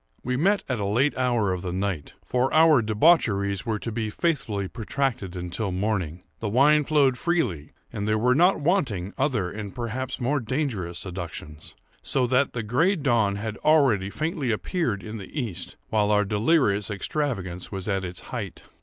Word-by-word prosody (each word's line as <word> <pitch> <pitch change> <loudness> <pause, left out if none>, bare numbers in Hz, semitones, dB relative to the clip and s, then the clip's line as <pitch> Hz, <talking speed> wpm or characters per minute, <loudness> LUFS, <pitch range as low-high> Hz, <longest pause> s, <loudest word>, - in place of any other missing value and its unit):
We 125 +1 -1
met 195 +9 +2
at 130 -4 -1
a 100 - -1
late 125 +9 +2
hour 120 -6 +1
of 90 - -4
the 90 - -4
night; 95 -4 -3
for 125 +2 +1
our 155 -4 +6
debaucheries 105 - +2
were 110 -2 0
to 115 - -5
be 110 -1 -2
faithfully 110 - -1
protracted 115 -3 -2
until 90 +3 -3
morning. 90 -3 -2 0.2
The 105 - -2
wine 145 +6 +4
flowed 140 -4 +3
freely, 125 - -1 0.2
and 100 - -3
there 110 0 +2
were 125 +3 +3
not 175 +7 +4
wanting 130 - 0
other 120 - 0
and 105 -1 -7
perhaps 125 +2 -4
more 135 +4 +1
dangerous 115 - -2
seductions; 85 -4 -7 0.3
so 130 -2 +1
that 130 +3 +2
the 115 - -3
gray 145 - +2
dawn 120 - +1
had 110 +1 -4
already 135 -11 +3
faintly 155 - -2
appeared 115 - -1
in 110 0 -6
the 100 +10 -6
east, 95 -9 -4
while 105 -1 +2
our 105 -1 +3
delirious 105 - +2
extravagance 100 - -3
was 95 -1 -4
at 95 -2 0
its 90 0 -6
height. 105 -8 -5
110 Hz, 170 wpm, -25 LUFS, 100-135 Hz, 0.3 s, our